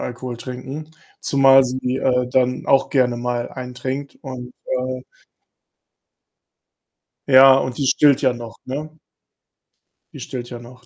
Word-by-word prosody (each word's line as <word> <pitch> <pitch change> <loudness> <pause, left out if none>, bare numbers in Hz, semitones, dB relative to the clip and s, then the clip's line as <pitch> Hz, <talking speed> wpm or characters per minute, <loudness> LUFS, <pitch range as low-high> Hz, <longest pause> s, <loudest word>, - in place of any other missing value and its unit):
Alkohol 125 0 -6
trinken, 130 +5 -8 0.3
zumal 135 -1 +5
sie, 130 0 -2
äh, 125 -1 +1
dann 125 0 0
auch 135 - +3
gerne 125 -3 +2
mal 120 0 -3
einen 125 -1 -8
trinkt. 135 +2 -5
Und, 125 -2 -8
äh 130 0 -3 2.3
Ja, 135 0 +8
und 130 -2 -3
die 140 -2 0
stillt 140 +1 +4
ja 130 -2 +2
noch, 115 -1 -9
ne? 155 +4 -6 1.2
Die - - -10
stillt 120 -2 -6
ja 120 - -7
noch, 125 +1 -15
130 Hz, 135 wpm, -20 LUFS, 125-135 Hz, 2.3 s, Ja